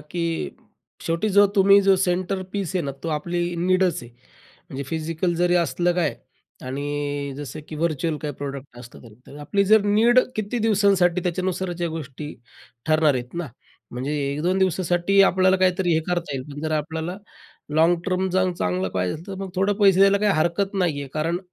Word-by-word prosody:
की 165 +2 -3 0.6
शेवटी 165 +6 0
जो 205 0 +5
तुम्ही 200 +1 +6
जो 195 0 +5
सेंटर 185 +1 -1
पीस 195 -3 -3
आहे 180 - 0
ना, 140 - -2
तो 165 - -3
आपली 175 +3 -2
नीडच 185 -2 +1
आहे. 120 - -12 0.6
म्हणजे 135 +1 -5
फिजिकल 165 +2 -2
जरी 175 +1 +2
असलं 175 +1 +1
काय, 170 -5 0 0.5
आणि 145 +1 -3
अ, - - -7
जसं 145 +1 -7
की 155 - -7
व्हर्च्युअल 160 0 -1
काही 145 -2 -4
प्रॉडक्ट 140 -2 -7
असतं 120 -1 -12
तरी. 115 -3 -14
तर 140 - -12
आपली 200 +7 0
जर 215 +1 +5
नीड 225 +4 +4 0.2
किती 215 +3 -2
दिवसांसाठी 195 -5 +2
त्याच्यानुसारच्या 180 -1 -2
गोष्टी 150 -2 -7 0.5
ठरणार 155 -2 +3
आहेत 125 +3 -5
ना. 170 -2 -3 0.4
म्हणजे, 130 +5 -3 0.2
1-2 175 +6 0
दिवसासाठी 185 +1 +2
आपल्याला 185 0 +4
काहीतरी 185 -1 +2
हे 160 - +2
करता 175 -5 -2
येईल, 130 - -3
पण 145 - -7
जर 155 0 -2
आपल्याला 160 +3 -4 0.6
लाँग 165 +2 +4
टर्म 185 0 0
चांग 185 0 +1
चांगलं 90 - -1
पाहिजे 90 -1 -1
असेल 160 - -10
तर 195 - -6
मग 190 - -5
थोडं 195 +2 +1
पैसे 195 -3 +4
द्यायला 195 +1 +5
काही 205 -1 +2
हरकत 175 +5 0
नाही 175 -7 0
आहे. 140 - -6
कारण 165 +3 -1
175 Hz, 180 wpm, -23 LUFS, 150-190 Hz, 0.6 s, तुम्ही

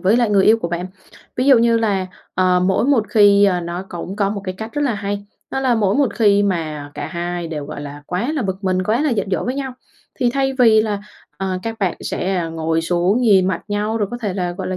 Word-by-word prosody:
với 200 +5 +3
lại 235 -3 +2
người 195 -2 +4
yêu 225 +1 +5
của 170 - -3
bạn. 175 +1 -3 0.5
Ví 255 +2 0
dụ 265 -4 +7
như, 230 0 +3 0.5
ờ, 180 -1 +3
mỗi 190 +5 +2
một 260 -6 +3
khi 205 -1 +5
ờ, 180 -3 +2
nó 175 +2 -5
cũng 180 +2 -6
có 200 -1 +1
một 205 -1 -4
cái 185 -1 -4
cách 220 +1 -6
rất 295 0 -1
là 250 -6 +1
hay, 205 0 -4 0.3
đó 270 - -2
là 255 -3 +2
mỗi 205 -3 +1
một 280 -2 +1
khi 205 -2 +4
mà 155 -7 -2
cả - - -4
hai 175 -1 -4
đều, 150 -3 -4
gọi - - -7
là, 145 0 -8
quá 225 +12 -2
là 280 - -1
bực 190 0 -4
mình, 185 0 +1
quá 220 +6 +1
là 300 - +1
giận 200 -4 -1
dỗi 185 - 0
với 250 +2 -2
nhau, 270 -2 -4 0.4
thì 245 -3 +1
thay 270 -1 0
vì 220 -3 +6
là, 210 -2 -2 0.4
ờ, 190 -1 -2
các 225 0 -5
bạn 190 -4 0
sẽ, 190 0 -2
à, 170 -2 -1
ngồi 160 0 -1
xuống 175 +7 +1
nhìn 195 -6 +4
mặt 170 - -2
nhau, 210 +2 -1
rồi 205 -3 -1
có 240 - -5
thể 205 -6 -3
là, 180 -2 -2
gọi - - -5
là, 185 - -2
200 Hz, 260 wpm, -19 LUFS, 180-225 Hz, 0.5 s, dụ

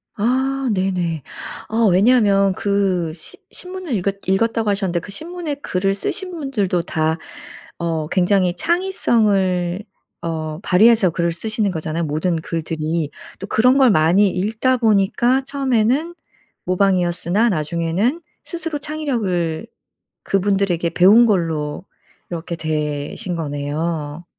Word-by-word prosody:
아 260 +4 0
네네. 180 -5 -1 0.5
아 225 0 +2
왜냐하면 200 -1 +4
그 190 -4 0
시 170 - -10
신문을 365 -5 -6
읽었 195 0 -1
읽었다고 225 +3 +1
하셨는데 195 -4 0
그 195 - -10
신문에 325 - -5
글을 195 -8 -1
쓰신 365 - -4
분들도 250 - -1
다 160 -1 0 0.6
어 165 -2 -1
굉장히 180 0 +2
창의성을 205 - +1 0.4
어 155 -2 -3
발휘해서 210 0 +5
글을 170 +1 0
쓰시는 215 +3 -1
거잖아요, 160 0 -3
모든 155 +4 -1
글들이. 160 -1 -3 0.3
또 195 - -6
그런 250 +6 +4
걸 265 -2 +6
많이 180 +4 +4
읽다 215 +8 0
보니까 235 +4 +2
처음에는 270 +3 +1 0.5
모방이었으나 185 +2 +1
나중에는 170 - -1 0.2
스스로 330 -3 -4
창의력을 230 - -2 0.6
그분들에게 195 -3 +1
배운 205 +7 +6
걸로 165 -5 -1 0.5
이렇게 170 0 -4
되신 155 +2 -3
거네요. 150 +1 -3
190 Hz, 275 characters per minute, -20 LUFS, 170-230 Hz, 0.6 s, 걸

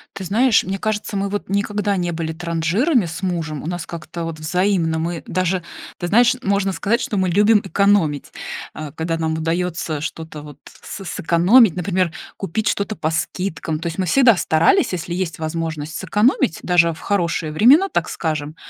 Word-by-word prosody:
Ты 195 - -6
знаешь, 230 +5 +3
мне 195 +1 -2
кажется, 210 0 -3
мы, 200 0 -1
вот, 205 0 -4
никогда 205 +1 0
не 175 -2 -1
были 160 -1 -3
транжирами 175 - +1
с 165 +4 -6
мужем, 165 -5 -3
у - - -5
нас 175 -1 -4
как-то, 170 0 -6
вот, 165 -1 -6
взаимно. 170 0 0
Мы 170 0 -3
даже, 185 0 -1 0.3
ты 175 - -3
знаешь, 240 +5 +4
можно 200 -2 0
сказать, 230 +6 0
что 215 - -3
мы 185 -2 +1
любим 210 +3 +4
экономить. 195 -7 +1 0.4
Э, 155 -2 -7
когда 165 +1 -3
нам 160 -1 -1
удаётся 165 -2 -2
что-то 160 -1 -6
вот 145 -2 -12 0.2
с 195 - -8
сэкономить, 175 +6 +4
например, 180 -1 0 0.2
купить 195 +3 -3
что-то 205 +1 -1
по 155 - -1
скидкам. 160 -1 -3
То 170 - -4
есть, 165 - -5
мы 190 - 0
всегда 235 +4 +5
старались, 160 +1 +3
если 175 -1 -4
есть 175 -3 -3
возможность, 160 -1 -4
сэкономить, 210 - +1
даже 170 -2 +3
в 160 - -13
хорошие 170 -5 -1
времена, 275 - +6
так - - -1
скажем, 155 -1 -3
175 Hz, 175 wpm, -20 LUFS, 160-200 Hz, 0.4 s, времена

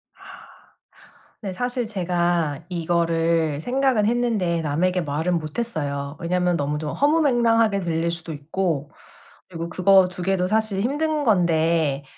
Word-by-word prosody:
아. - - -23 1.2
네 195 -4 -5
사실 245 +2 -2
제가 175 -6 -1
이거를 165 -3 0
생각은 255 -1 +1
했는데 220 -8 0
남에게 180 +5 0
말은 160 +4 -1
못 155 +7 -6
했어요. 145 -10 -3
왜냐면 180 0 0
너무 145 0 -2
좀 150 -2 -4
허무맹랑하게 235 -9 +2
들릴 170 -1 -1
수도 170 -1 -5
있고 150 0 -3 0.6
그리고 170 -1 -6
그거 190 +1 +4
2 180 0 -7
개도 185 -1 +1
사실 215 -1 0
힘든 300 +4 0
건데 165 - +2
175 Hz, 270 characters per minute, -23 LUFS, 160-220 Hz, 1.2 s, 그거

